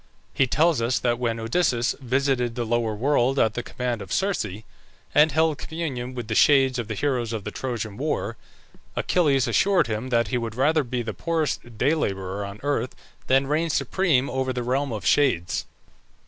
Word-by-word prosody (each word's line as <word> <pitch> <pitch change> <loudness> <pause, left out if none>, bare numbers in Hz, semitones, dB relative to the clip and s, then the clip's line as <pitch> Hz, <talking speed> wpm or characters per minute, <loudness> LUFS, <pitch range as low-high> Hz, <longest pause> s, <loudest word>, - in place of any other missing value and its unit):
He 135 - +2
tells 155 0 +2
us 120 +3 +1
that 120 -1 0
when 115 -2 -1
Odysseus 120 0 +1
visited 130 -2 0
the 120 -2 -2
lower 115 -1 0
world 135 +2 +1
at 110 -5 +3
the 120 - -3
command 120 -2 -3
of - - -9
Circe, 110 - -1 0.5
and 150 +1 +5
held 160 -1 +1
communion 135 -8 -4
with 120 -3 -5
the 110 - -2
shades 135 +1 +4
of 115 - -3
the 110 - -4
heroes 125 -2 -1
of 110 -3 -4
the - - -5
Trojan 115 -5 -4
war, - - -2 0.6
Achilles 140 -7 +2
assured 180 - +3
him 115 +2 -3
that 115 -3 +1
he 125 - 0
would 115 -2 -5
rather 150 +4 +2
be 125 -1 -3
the 110 -1 -4
poorest 155 -8 -2
day 140 +8 +3
labourer 95 -8 -2
on 100 +1 -7
earth 135 -4 -1 0.3
than 135 +1 +3
reign 155 +4 0
supreme 155 -5 +1
over 130 0 -1
the 125 -1 -3
realm 135 +3 0
of 110 -3 -5
shades. 125 -13 +2
125 Hz, 185 wpm, -24 LUFS, 115-145 Hz, 0.6 s, and